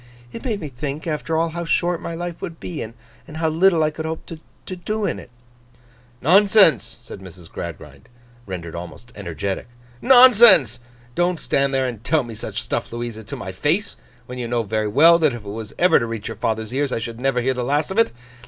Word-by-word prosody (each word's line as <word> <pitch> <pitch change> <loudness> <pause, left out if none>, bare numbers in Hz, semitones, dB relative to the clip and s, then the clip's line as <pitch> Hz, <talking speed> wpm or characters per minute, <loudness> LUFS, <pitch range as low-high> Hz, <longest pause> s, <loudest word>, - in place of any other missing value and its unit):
It 230 - -8
made 225 -6 -2
me 155 - -5
think, 140 +3 -6
after 160 0 -2
all, 165 +1 +1
how 170 +1 -5
short 175 +1 0
my 170 - -5
life 175 0 -6
would 165 -2 -6
be, 170 - -6
and 110 0 -7 0.4
how 160 0 0
little 165 0 +3
I 155 - +1
could 160 +1 -6
hope 160 0 -5 0.4
to 185 - -6
do 210 +4 -3
in - - -2
it.' - - -13 0.9
'Nonsense!' 190 - +4
said 115 - -10
Mrs. 90 -3 -13
Gradgrind, 75 -5 -9 0.4
rendered 85 -3 -6
almost 90 +7 -9
energetic. 95 0 -4 0.3
'Nonsense! 230 - +7 0.3
Don't 175 +1 0
stand 140 0 0
there 135 -1 +1
and 115 -3 -7
tell 155 +2 +2
me 120 -1 -8
such 110 - -5
stuff, - - -3
Louisa, 120 -1 -6
to - - -7
my 95 - -6
face, 155 - -1 0.3
when 125 0 -8
you 120 - -3
know 120 0 0
very 110 0 -1
well 165 +10 +6
that 155 -5 +2
if 115 -3 -8
it - - -10
was 110 +1 -7
ever 180 +1 +5
to 115 - -3
reach 115 -2 -5
your - - -7
father's 110 +1 -2
ears 140 0 0
I - - -1
should 115 0 -6
never 135 -1 +1
hear 130 +2 0
the 125 -1 -3
last 145 +6 0
of 200 - 0
it. 230 - +3
135 Hz, 210 wpm, -21 LUFS, 110-170 Hz, 0.9 s, Nonsense